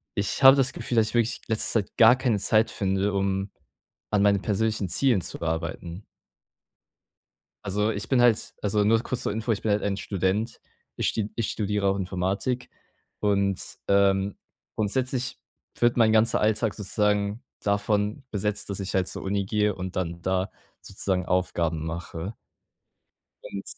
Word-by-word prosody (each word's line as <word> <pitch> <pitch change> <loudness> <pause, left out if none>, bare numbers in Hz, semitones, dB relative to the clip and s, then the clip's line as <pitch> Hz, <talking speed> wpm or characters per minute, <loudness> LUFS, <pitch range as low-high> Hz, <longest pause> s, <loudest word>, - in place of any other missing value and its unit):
ich 100 +6 -2
habe 135 +1 +10
das 130 -2 +2
Gefühl, 120 - -4
dass 110 -1 +3
ich - - -9
wirklich 120 -1 +1
in - - -7
letzter 110 0 +2
Zeit - - -31
gar 115 +2 +8
keine 120 -6 0
Zeit 110 +2 +3
finde, 95 +1 0
um 95 0 -1 0.6
an 105 -1 +3
meine 100 -1 +4
persönlichen 105 -1 -1
Zielen 120 -7 +2
zu - - -7
arbeiten. 85 +3 -4 1.6
Also, 105 +2 0
ich - - -5
bin 130 -3 +4
halt 120 -3 +3
also 105 0 +1
nur 110 +2 +4
kurz 125 - -3
zur - - -1
Info, 110 +3 -4
ich - - -5
bin 110 - 0
halt 105 0 +2
ein 100 -1 0
Student. 100 +4 -2 0.4
Ich - - 0
st 110 -2 -2
ich 115 -3 -1
studiere 105 -1 -1
auch 95 - +2
Informatik 95 +6 -2 0.5
und, 100 -2 0
ähm, 100 0 +3 0.4
grundsätzlich 130 +4 -1 0.4
wird 120 0 +3
mein 115 -2 +5
ganzer 110 +1 +3
Alltag 110 0 +1
sozusagen 105 +1 0 0.2
davon 105 +4 0
besetzt, 105 0 -2
dass 100 0 -3
ich 95 - -4
halt 95 -1 +1
zur - - -5
Uni 100 0 -1
gehe 105 +1 +1
und 95 0 -6
dann 85 -1 -3
da 95 +2 -1 0.3
sozusagen 95 -2 -2
Aufgaben 85 -3 0
mache. 85 +4 -5 1.1
Und, 100 - -6
100 Hz, 160 wpm, -26 LUFS, 95-110 Hz, 1.6 s, habe